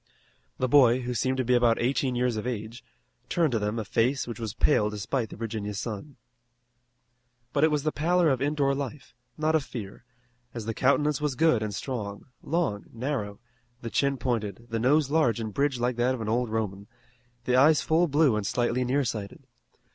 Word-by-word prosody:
The 130 Hz, -, 0 dB
boy, 130 Hz, -2 st, +5 dB
who 125 Hz, 0 st, -3 dB
seemed 130 Hz, +2 st, 0 dB
to 130 Hz, -, 0 dB
be 125 Hz, -, +2 dB
about 120 Hz, -2 st, +4 dB
eighteen 130 Hz, +1 st, 0 dB
years 125 Hz, -1 st, +1 dB
of 110 Hz, +2 st, -3 dB
age, 115 Hz, -1 st, -5 dB, 0.5 s
turned 165 Hz, -4 st, +2 dB
to 115 Hz, -, +1 dB
them 105 Hz, +2 st, -2 dB
a 110 Hz, -, -3 dB
face 125 Hz, +7 st, +1 dB
which 120 Hz, -2 st, -7 dB
was 110 Hz, -2 st, -5 dB
pale 105 Hz, -8 st, +3 dB
despite 105 Hz, +3 st, -2 dB
the -, -, -9 dB
Virginia 110 Hz, -2 st, -4 dB
sun. 115 Hz, +7 st, -5 dB, 1.4 s
But 145 Hz, -, +2 dB
it 160 Hz, -, +6 dB
was 150 Hz, -2 st, 0 dB
the 155 Hz, -, +1 dB
pallor 170 Hz, +2 st, +2 dB
of 130 Hz, -, -1 dB
indoor 140 Hz, -1 st, +1 dB
life, 140 Hz, 0 st, -6 dB, 0.2 s
not 155 Hz, +1 st, +1 dB
of 160 Hz, -3 st, +2 dB
fear, 110 Hz, -5 st, -8 dB, 0.5 s
as 115 Hz, -3 st, -5 dB
the 115 Hz, -, -2 dB
countenance 145 Hz, +4 st, +2 dB
was 150 Hz, -3 st, -1 dB
good 160 Hz, -6 st, +3 dB
and 105 Hz, -1 st, -2 dB
strong, 105 Hz, -6 st, -5 dB, 0.2 s
long, 145 Hz, -, -1 dB
narrow, 115 Hz, -5 st, -3 dB, 0.4 s
the 115 Hz, -, -5 dB
chin 140 Hz, -1 st, +1 dB
pointed, 115 Hz, -3 st, -3 dB
the 115 Hz, -, -1 dB
nose 140 Hz, +4 st, +2 dB
large 150 Hz, -9 st, +2 dB
and 110 Hz, -2 st, -4 dB
bridged 140 Hz, -1 st, 0 dB
like 120 Hz, 0 st, 0 dB
that 125 Hz, +2 st, +2 dB
of 120 Hz, -, -7 dB
an 110 Hz, -, -3 dB
old 120 Hz, +1 st, 0 dB
Roman, 105 Hz, -2 st, -3 dB, 0.6 s
the 125 Hz, -, +2 dB
eyes 150 Hz, +4 st, +5 dB
full 165 Hz, +2 st, +3 dB
blue 145 Hz, -5 st, +3 dB
and 105 Hz, -2 st, -2 dB
slightly 120 Hz, +1 st, 0 dB
nearsighted. 120 Hz, -6 st, -2 dB
125 Hz, 195 wpm, -27 LUFS, 110-140 Hz, 1.4 s, it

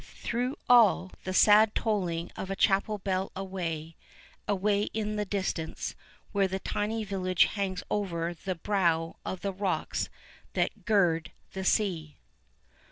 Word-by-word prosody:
Through 250 Hz, +4 st, -3 dB
all, 220 Hz, -6 st, +5 dB
the 185 Hz, -, -2 dB
sad 210 Hz, +3 st, +6 dB
tolling 180 Hz, -7 st, -1 dB
of 190 Hz, -, -5 dB
a 195 Hz, -, -1 dB
chapel 200 Hz, +2 st, +2 dB
bell 190 Hz, -1 st, -2 dB
away, 170 Hz, -4 st, -4 dB, 0.5 s
away 205 Hz, +1 st, +1 dB
in 215 Hz, -1 st, -1 dB
the 210 Hz, 0 st, -1 dB
distance, 190 Hz, -5 st, -3 dB, 0.4 s
where 200 Hz, -2 st, +2 dB
the 190 Hz, 0 st, -2 dB
tiny 215 Hz, +3 st, -2 dB
village 185 Hz, -3 st, +2 dB
hangs 190 Hz, -3 st, -2 dB
over 175 Hz, -4 st, -1 dB
the 185 Hz, +2 st, -4 dB
brow 165 Hz, -3 st, 0 dB
of 190 Hz, -, -4 dB
the 200 Hz, -1 st, -2 dB
rocks 190 Hz, -1 st, -1 dB, 0.4 s
that -, -, -1 dB
gird 175 Hz, -7 st, +2 dB, 0.2 s
the 190 Hz, -, -4 dB
sea. 175 Hz, -7 st, 0 dB
195 Hz, 135 wpm, -29 LUFS, 180-210 Hz, 0.5 s, sad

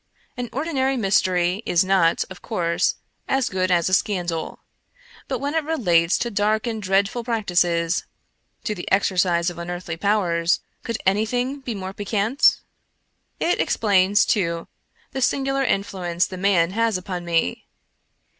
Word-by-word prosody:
An 245 Hz, -1 st, -4 dB
ordi 315 Hz, +5 st, -3 dB
nary 265 Hz, 0 st, +1 dB
mystery 185 Hz, -3 st, +1 dB
is 175 Hz, -2 st, +2 dB
not, 185 Hz, -3 st, +3 dB
of 180 Hz, -1 st, -10 dB
course, 170 Hz, -1 st, 0 dB, 0.3 s
as 270 Hz, -2 st, +1 dB
good 185 Hz, -1 st, -1 dB
as 175 Hz, -2 st, +2 dB
a 185 Hz, -, -1 dB
scandal, 175 Hz, -5 st, -1 dB, 0.7 s
but -, -, -2 dB
when 285 Hz, +1 st, -3 dB
it 320 Hz, -1 st, +1 dB
relates 180 Hz, -, +2 dB
to 235 Hz, -, -2 dB
dark 210 Hz, +2 st, +1 dB
and 225 Hz, -2 st, -3 dB
dreadful 200 Hz, +4 st, +1 dB
practices 180 Hz, -7 st, 0 dB, 0.3 s
— -, -, -46 dB
to 215 Hz, -, -1 dB
the 180 Hz, -4 st, -6 dB
exer 190 Hz, 0 st, +2 dB
cise 175 Hz, -1 st, +2 dB
of 170 Hz, -, -10 dB
unearthly 175 Hz, -1 st, -5 dB
powers 175 Hz, -4 st, +1 dB
— -, -, -45 dB
could 230 Hz, -2 st, -3 dB
anything 245 Hz, +8 st, 0 dB
be 250 Hz, -4 st, -5 dB
more 190 Hz, -1 st, -6 dB
piquant? 210 Hz, +6 st, +2 dB, 0.8 s
It 350 Hz, -, +1 dB
explains, 200 Hz, -1 st, +3 dB
too, 170 Hz, -5 st, 0 dB, 0.4 s
the 265 Hz, -, -4 dB
singular 270 Hz, +1 st, +1 dB
influence 185 Hz, -6 st, 0 dB
the 185 Hz, -, -7 dB
man 180 Hz, -2 st, +2 dB
has 225 Hz, -1 st, +1 dB
upon 180 Hz, -1 st, -5 dB
me. 165 Hz, -, -1 dB
195 Hz, 155 wpm, -23 LUFS, 175-230 Hz, 0.8 s, not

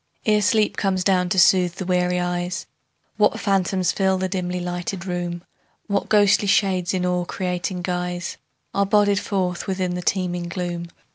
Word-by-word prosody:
Ere 210 Hz, -1 st, +3 dB
sleep 210 Hz, +1 st, +2 dB
comes 190 Hz, -2 st, 0 dB
down 180 Hz, -2 st, +2 dB
to 190 Hz, -, -1 dB
soothe 180 Hz, -1 st, +4 dB
the 190 Hz, -, -5 dB
weary 180 Hz, 0 st, +1 dB
eyes, 175 Hz, +1 st, -2 dB, 0.5 s
What 210 Hz, -1 st, +3 dB
phantoms 190 Hz, -2 st, +1 dB
fill 190 Hz, -1 st, +1 dB
the 190 Hz, 0 st, -1 dB
dimly 180 Hz, -1 st, -2 dB
lighted 175 Hz, +1 st, -4 dB
room; 175 Hz, -1 st, -3 dB, 0.4 s
What 200 Hz, -1 st, -1 dB
ghostly 205 Hz, -1 st, +4 dB
shades 185 Hz, -3 st, +2 dB
in 180 Hz, -1 st, 0 dB
awe 180 Hz, 0 st, 0 dB
creating 180 Hz, 0 st, -3 dB
guise 180 Hz, 0 st, -3 dB, 0.4 s
Are 200 Hz, 0 st, +1 dB
bodied 205 Hz, -1 st, +3 dB
forth 185 Hz, -5 st, -2 dB
within 185 Hz, -2 st, -1 dB
the 180 Hz, -, -3 dB
teeming 175 Hz, -1 st, -1 dB
gloom. 175 Hz, -1 st, -4 dB
180 Hz, 160 wpm, -22 LUFS, 180-195 Hz, 0.5 s, soothe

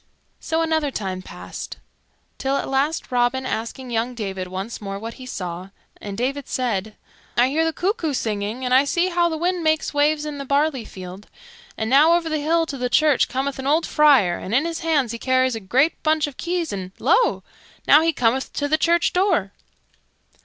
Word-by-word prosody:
So 325 Hz, 0 st, -1 dB
another 315 Hz, -2 st, 0 dB
time 190 Hz, -7 st, -4 dB
passed, -, -, -8 dB, 0.6 s
till 270 Hz, +1 st, 0 dB
at -, -, -3 dB
last 275 Hz, +4 st, -1 dB
Robin 250 Hz, +1 st, +1 dB
asked 230 Hz, -2 st, -3 dB
young 245 Hz, -1 st, -3 dB
David 195 Hz, -4 st, -4 dB
once 190 Hz, +6 st, -6 dB
more 195 Hz, -1 st, -5 dB
what 225 Hz, +3 st, -6 dB
he 255 Hz, -, -8 dB
saw; 180 Hz, -4 st, -5 dB, 0.3 s
and 200 Hz, -1 st, -7 dB
David 270 Hz, +3 st, -2 dB
said, 215 Hz, -4 st, -2 dB, 0.4 s
"I 245 Hz, +2 st, +4 dB
hear 315 Hz, +4 st, +1 dB
the 325 Hz, -, +1 dB
cuckoo 355 Hz, -2 st, -1 dB
singing, 215 Hz, +2 st, -3 dB
and 250 Hz, -, 0 dB
I 260 Hz, +2 st, +6 dB
see 345 Hz, +6 st, +1 dB
how 345 Hz, -1 st, +2 dB
the 320 Hz, -, -3 dB
wind 350 Hz, +1 st, -1 dB
makes 315 Hz, -1 st, +1 dB
waves 295 Hz, +1 st, +2 dB
in 295 Hz, -1 st, -5 dB
the -, -, -4 dB
barley 280 Hz, -2 st, 0 dB
field; 185 Hz, +2 st, -10 dB, 0.5 s
and 220 Hz, -, -2 dB
now 290 Hz, +7 st, +6 dB
over 340 Hz, -1 st, +1 dB
the 310 Hz, -1 st, -1 dB
hill 330 Hz, +2 st, +2 dB
to 280 Hz, -4 st, -6 dB
the 250 Hz, 0 st, -1 dB
church 300 Hz, +1 st, +3 dB
cometh 270 Hz, +1 st, -2 dB
an 265 Hz, -, -4 dB
old 315 Hz, +4 st, +3 dB
friar, 270 Hz, -13 st, +4 dB
and 205 Hz, -, -3 dB
in 275 Hz, +5 st, +3 dB
his 335 Hz, -1 st, -3 dB
hands 300 Hz, -8 st, +1 dB
he 235 Hz, -, -6 dB
carries 260 Hz, 0 st, +2 dB
a 225 Hz, -, -3 dB
great 260 Hz, -, +1 dB
bunch 310 Hz, -1 st, +2 dB
of 290 Hz, -3 st, -8 dB
keys; 345 Hz, -, -2 dB
and 190 Hz, -1 st, -6 dB
lo! -, -, +2 dB, 0.4 s
Now 295 Hz, -, +7 dB
he 330 Hz, +1 st, +2 dB
cometh 255 Hz, -2 st, 0 dB
to 290 Hz, -, -1 dB
the 310 Hz, +2 st, +1 dB
church 340 Hz, 0 st, +2 dB
door." 360 Hz, -, +1 dB
270 Hz, 200 wpm, -22 LUFS, 225-315 Hz, 0.6 s, Now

